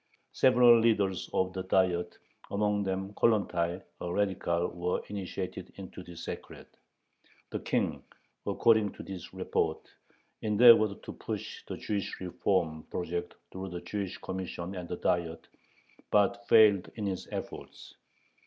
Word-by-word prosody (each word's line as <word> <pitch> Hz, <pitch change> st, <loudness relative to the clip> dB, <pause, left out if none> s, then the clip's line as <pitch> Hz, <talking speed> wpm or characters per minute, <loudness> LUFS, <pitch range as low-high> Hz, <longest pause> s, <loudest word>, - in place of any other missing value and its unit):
Several 120 Hz, -2 st, +6 dB
leaders 105 Hz, -5 st, +1 dB
of 95 Hz, 0 st, 0 dB
the 95 Hz, -, -3 dB
Diet, 95 Hz, -2 st, +1 dB, 0.3 s
among 105 Hz, 0 st, +1 dB
them 95 Hz, 0 st, -2 dB
Kollontay, 95 Hz, -5 st, +1 dB, 0.2 s
a 90 Hz, -, -4 dB
radical, 90 Hz, -3 st, 0 dB
were 90 Hz, +1 st, -2 dB
initiated 95 Hz, -2 st, -5 dB
into 95 Hz, -1 st, -9 dB
the 90 Hz, -1 st, -11 dB
secret. 85 Hz, -, -8 dB, 0.8 s
The -, -, -2 dB
King, -, -, -1 dB, 0.5 s
according 110 Hz, -3 st, +3 dB
to -, -, -9 dB
this 95 Hz, -2 st, -8 dB
report, -, -, -1 dB, 0.5 s
endeavored 110 Hz, -1 st, +6 dB
to -, -, -7 dB
push -, -, -6 dB
the -, -, -5 dB
Jewish 100 Hz, -2 st, -3 dB
reform 90 Hz, -3 st, 0 dB
project 85 Hz, 0 st, -3 dB, 0.2 s
through 95 Hz, 0 st, -6 dB
the 90 Hz, -1 st, -6 dB
Jewish 95 Hz, +1 st, -4 dB
Commission 95 Hz, -1 st, -5 dB
and 90 Hz, -2 st, -6 dB
the 90 Hz, -, -3 dB
Diet, 85 Hz, -2 st, -1 dB, 0.6 s
but 120 Hz, +3 st, +2 dB
failed 105 Hz, -4 st, +6 dB
in 105 Hz, -, -3 dB
his 95 Hz, -2 st, -3 dB
efforts. -, -, -7 dB
95 Hz, 130 wpm, -30 LUFS, 90-105 Hz, 0.8 s, Several